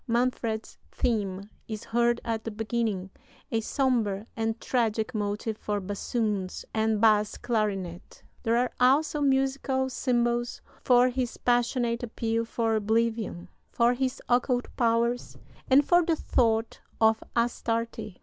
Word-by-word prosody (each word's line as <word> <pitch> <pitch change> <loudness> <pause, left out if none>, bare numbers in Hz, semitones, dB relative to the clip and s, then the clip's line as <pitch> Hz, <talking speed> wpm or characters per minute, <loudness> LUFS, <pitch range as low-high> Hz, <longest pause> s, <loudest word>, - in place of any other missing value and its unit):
Manfred's 235 -2 -1
theme 200 -4 -1 0.2
is 215 -1 -5
heard 235 +1 +1
at 225 -1 -2
the - - -3
beginning 215 -3 -2 0.4
a 225 - +1
sombre 225 -5 0
and 225 0 -1
tragic 230 -1 0
motive 210 +1 -2
for 205 -1 -2
bassoons 205 0 -2
and 220 -1 +1
bass 210 -1 +3
clarinet. 200 -7 -3 0.2
There 230 -1 +1
are 250 +1 +1
also 290 +4 +3
musical 265 -1 +1
symbols 240 -1 0 0.2
for 250 0 +5
his 250 -1 -3
passionate 240 -1 +1
appeal 230 -1 -2
for 225 -1 0
oblivion, 220 -4 0 0.2
for 235 +1 +3
his 260 +1 -2
occult 245 0 +1
powers, 235 +1 +1 0.3
and 275 +2 +6
for 350 +2 +5
the 330 0 +1
thought 225 -6 0 0.2
of 220 0 +3
Astarte. 230 -3 -1
230 Hz, 125 wpm, -27 LUFS, 220-245 Hz, 0.4 s, and